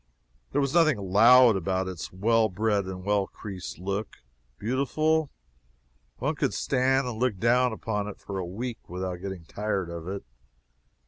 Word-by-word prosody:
There 145 - +1
was 140 0 -1
nothing 160 -6 +4
"loud" 115 +5 +6
about 95 0 -1
its 90 -3 -6
well 110 +4 +2
bred 105 0 0
and 95 -1 -6
well 100 -1 +1
creased 95 -3 -8
look. 100 +3 -4 0.4
Beautiful? 150 +6 +1 0.9
One - - -1
could - - -1
stand 130 0 +1
and 115 -3 -5
look 125 -5 +1
down 125 +4 +3
upon 105 -2 -3
it 105 - -8
for 100 -1 -5
a - - -2
week 115 +7 -5
without 90 0 -4
getting 95 -2 -7
tired 100 -2 -2
of 85 0 -7
it. 100 +1 -4
105 Hz, 155 wpm, -27 LUFS, 95-125 Hz, 0.9 s, loud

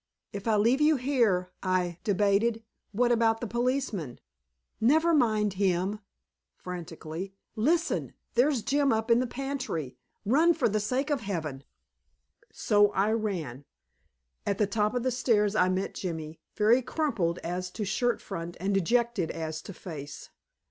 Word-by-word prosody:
"If 200 +2 -6
I 220 - +3
leave 230 +7 +3
you 305 +1 +5
here," 235 -9 +1
I 180 -2 0
debated, 210 +3 +2 0.3
"what 240 +3 +2
about 225 -1 +3
the 240 - -4
policeman?" 235 - -2 0.6
"Never 315 +8 +4
mind 215 - +2
him" 190 +2 +1 0.6
frantically. 175 +1 -7 0.2
"Listen! 320 +10 0 0.2
There's 250 -1 +2
Jim 280 0 +2
up 225 +1 0
in 230 - +6
the 255 - 0
pantry. 260 - -4 0.3
Run, 315 +10 +4
for 295 - +2
the 215 0 0
sake 255 +8 -1
of 280 -4 0
Heaven!" 160 -9 -4 0.9
So 205 -1 +3
I 200 +3 +2
ran. 180 - -2 0.8
At 200 - -1
the 210 - +3
top 210 +2 0
of 245 - 0
the 255 - +1
stairs 215 -4 +2
I 185 -3 +4
met 185 +1 -1
Jimmy, 160 -3 -5 0.2
very 225 +4 +4
crumpled 230 - -1
as 180 +2 -3
to 210 +3 -4
shirt 235 +4 0
front 170 +1 -6
and 195 +3 -1
dejected 210 -1 +1
as 160 -1 -4
to - - -9
face. 150 -6 -9
210 Hz, 150 wpm, -28 LUFS, 180-245 Hz, 0.9 s, in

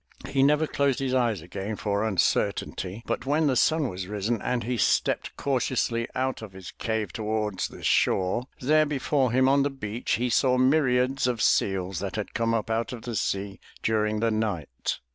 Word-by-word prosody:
He 135 - +1
never 150 +3 +4
closed 140 -3 +1
his 135 -2 -1
eyes 120 -8 +1
again 100 +4 -5
for 100 -1 -1
imcertainty 100 0 0
but - - -3
when 155 +3 +2
the 135 -3 +2
sun 155 +4 +3
was 90 -4 -5
risen 105 +2 -2
and 125 -2 -1
he 125 +3 -1
stepped 115 - +1
cautiously 125 -3 0
out 130 -1 -1
of 110 -4 -9
his 95 -1 -9
cave 110 -4 -3
towards 105 -3 -2
the - - -12
shore, 95 +6 +2
there 155 +4 +3
before 135 -2 +1
him 130 +1 +3
on 140 +1 +4
the 140 - +1
beach 115 -4 -4
he 125 +1 0
saw 125 +2 +3
myriads 130 -1 +2
of 120 -2 -1
seals 95 -4 +1
that 95 -1 -4
had 105 -2 -4
come 115 0 +1
up 115 0 -2
out 115 +2 -1
of 120 - -8
the 120 - -5
sea 100 +1 -2 0.2
during 105 -1 +1
the 115 0 +2
night. 100 - -2
115 Hz, 185 wpm, -26 LUFS, 105-130 Hz, 0.2 s, never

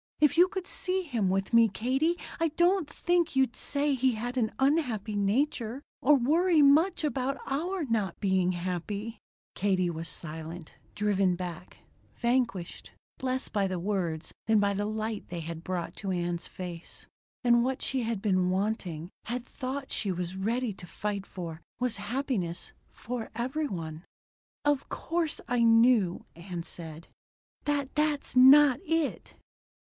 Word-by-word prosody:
If 300 -1 +4
you 350 +2 +7
could 375 -1 -5
see 375 -1 -2
him 230 - 0
with 195 +3 -1
me, 230 0 +7
Katie, 265 - 0 0.2
I 330 - +3
don't 350 -2 +3
think 345 0 +1
you'd 265 -3 +2
say 285 0 0
he 260 -1 +2
had 240 +3 -4
an 225 -4 +1
unhappy 255 -7 +1
nature 235 +4 0 0.2
or 295 +3 +6
worry 310 +5 +4
much 315 +6 +4
about 275 -2 -1
our 340 +6 -1
not 215 -7 -1
being 190 -2 +2
happy." 185 +5 -4 0.3
Katie 185 -3 +1
was 165 0 -5
silent, 160 +1 -7 0.2
driven 195 -3 +2
back; 180 -1 -7 0.3
vanquished, 235 -8 -1 0.3
less 260 0 -1
by 200 -2 0
the 185 -1 -2
words 175 -4 -2
than 220 -1 +5
by 200 0 +2
the 205 +1 -1
light 215 0 -3
they 175 -1 -4
had 165 0 -6
brought 180 -2 -3
to 200 - -4
Ann's 175 -1 -2
face. 175 -2 -7 0.4
And 240 -1 +5
what 260 +1 -1
she 265 -1 0
had 225 -4 -2
been 185 -3 +2
wanting 185 -4 -2
had 245 +1 -3
thought 265 +1 -5
she 200 - -1
was 180 0 -3
ready 225 +4 -1
to 180 -2 -11
fight 200 +1 -4
for 170 -3 -7 0.2
was 250 -2 0
happiness 205 -5 -3 0.2
for 240 -1 -5
every 260 +6 -1
one. 160 - -5 0.6
"Of 290 -2 +1
course 330 -2 -1
I 245 0 +1
know," 225 -5 +4
Ann 170 0 -6
said, 165 -1 -9 0.6
"that 285 -2 0
that's 300 -3 0
not 265 +1 +8
it." 325 -4 -1
225 Hz, 150 wpm, -29 LUFS, 185-275 Hz, 0.6 s, not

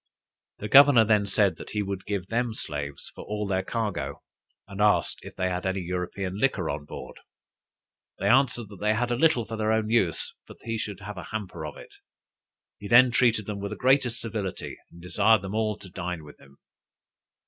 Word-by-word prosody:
The 105 - -5
governor 135 -1 +8
then 105 -2 +3
said, 100 0 +2
that - - -9
he 105 -1 -1
would 100 -1 -5
give 100 -3 -2
them 115 +2 -1
slaves 70 -6 -5
for - - -9
all 105 0 -3
their 95 -1 0
cargo; 105 0 -3 0.4
and 100 +1 -6
asked 105 0 +3
if - - -11
they 95 -1 0
had 90 0 -2
any 95 0 -1
European 90 +2 -4
liquor 105 -10 +1
on 75 +1 -5
board. - - -9 1.0
They - - -1
answered, 125 -4 +3
that 100 -3 -12
they 105 +2 +2
had 120 +2 -1
a - - +2
little 145 -3 +3
for 115 - -6
their 110 0 +1
own 110 0 0
use, 95 -9 +1
but - - -12
that - - -22
he 115 -1 -2
should 105 -2 -5
have 105 0 -7
a - - -8
hamper 110 -4 -5
of - - -9
it. - - -13 0.9
He 100 - -7
then 125 +3 +7
treated 115 -3 +3
them 105 -1 -5
with 100 0 -4
the 105 - -5
greatest 130 -2 +2
civility, 105 -5 -4 0.2
and 85 0 -14
desired 105 +3 +3
them 95 +1 -5
all 110 -1 0
to 100 - -12
dine 90 -3 -5
with 75 -1 -14
him. 70 +1 -19
105 Hz, 205 wpm, -26 LUFS, 95-115 Hz, 1.0 s, governor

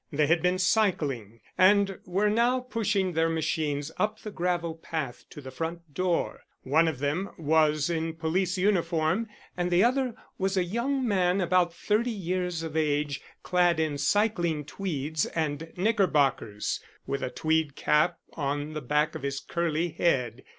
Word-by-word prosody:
They 150 0 +2
had 165 +2 +3
been 180 +1 +2
cycling, 150 - 0 0.2
and 195 +1 +4
were 195 +4 +1
now 235 +4 +3
pushing 210 -7 0
their 165 0 +2
machines 155 -2 -1
up 215 +1 +1
the 215 - -8
gravel 175 -2 -1
path 155 -6 -5
to 150 - -10
the 130 -1 -9
front 165 +2 -5
door. 180 +1 0 0.2
One 160 +5 +3
of 160 -4 -1
them 145 +8 -1
was 155 -1 +2
in 165 -1 -2
police 175 +3 0
uniform, 175 +1 +1 0.3
and 180 0 -1
the 175 +2 +4
other 255 -1 +1 0.2
was 195 0 0
a 185 - +3
young 245 +8 -1
man 185 -2 +2
about 180 -1 +3
thirty 215 +7 0
years 180 -5 -2
of 160 -1 -6
age, 145 -2 0 0.2
clad 175 -2 +2
in 155 -3 0
cycling 175 -8 +1
tweeds 155 -3 -2
and 160 0 -2
knickerbockers, 145 - +1 0.3
with 140 0 -2
a 130 - -2
tweed 155 0 0
cap 160 +3 +2 0.2
on 145 +1 -2
the 155 - -4
back 150 +4 +1
of - - -6
his 140 0 -2
curly 170 +2 -1
head. 130 -7 0
165 Hz, 155 wpm, -28 LUFS, 150-190 Hz, 0.3 s, and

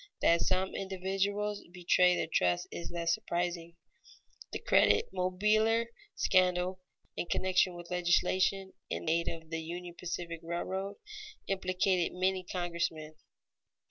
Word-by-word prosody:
That 170 0 +5
some 190 0 +1
individuals 195 +2 -2
betray 180 0 +4
their - - 0
trust 90 - +1
is 170 - -6
less 170 -1 0
surprising. 170 -1 -2 0.8
The - - -2
Credit 100 0 +4
Mobilier 210 +5 +2 0.3
scandal, 185 0 +2 0.4
in - - -3
connection 185 0 +2
with 175 0 -10
legislation 185 +2 +2 0.2
in - - -4
aid 170 +1 +2
of 160 -1 -5
the 165 0 -2
Union 175 +2 -6
Pacific 170 -1 -5
Railroad, 190 +4 -3 0.5
implicated 185 -1 +1
many 185 0 +1
congressmen. 170 -3 -3
180 Hz, 115 wpm, -32 LUFS, 170-190 Hz, 0.8 s, That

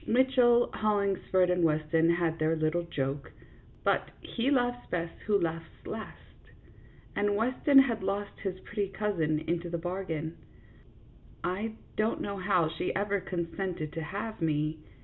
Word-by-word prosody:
Mitchell, 245 -1 +4
Hollings 200 -3 +1
ford, 185 -1 +4
and 180 -1 +2
Weston 160 +1 +3
had 165 -2 0
their 155 +1 +2
little 155 +2 +1
joke; 140 -4 -3 0.5
but - - +2
"he 240 +3 -1
laughs 245 -3 +1
best 170 -1 -2
who 205 -2 +4
laughs 165 -1 -2 0.2
last," - - -8 0.7
and 205 0 +2
Weston 255 +6 +3
has 245 -6 +6
lost 200 +1 -2
his 185 -2 -3
pretty 205 -2 -2
cousin 190 -6 0
into 170 +2 -2
the 170 - -1
bargain. 170 -2 -3 1.1
I 200 +5 -1 0.2
don't 215 +1 +1
know 200 0 -3
how 180 -3 +2
she 165 +3 -2
ever 200 0 +1
consented 175 -3 -3
to 165 - -3
have 205 +7 -5
me. 155 0 0
185 Hz, 145 wpm, -30 LUFS, 165-210 Hz, 1.1 s, has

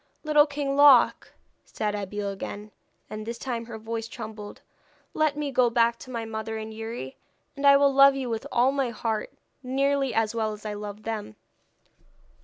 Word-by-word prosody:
'Little 300 -1 +4
King 285 -1 -2
Loc,' 285 -4 +5 0.3
said 210 -1 -3
Abeille 205 0 -3
again 205 +2 -7 0.4
and 215 0 -6
this 230 +2 -5
time 235 -2 -4
her 230 -2 -7
voice 225 +1 -5
trembled 215 -3 -9 0.5
'let 310 -2 +1
me 295 -2 -2
go 250 -2 +3
back 235 0 +2
to - - -11
my 230 -2 -4
mother 220 0 -5
and 220 0 -6
Youri, 225 - -7 0.4
and 280 0 +1
I 280 0 +8
will 280 0 +3
love 275 0 +7
you 265 -2 -3
with 225 -2 -4
all 250 +3 +3
my 275 -3 -1
heart, 220 -1 -3 0.3
nearly 275 +1 0
as 225 -1 +1
well 220 -2 -1
as 210 +1 -12
I 210 - -3
love 210 0 -7
them.' 215 - -5
230 Hz, 180 wpm, -26 LUFS, 215-275 Hz, 0.5 s, I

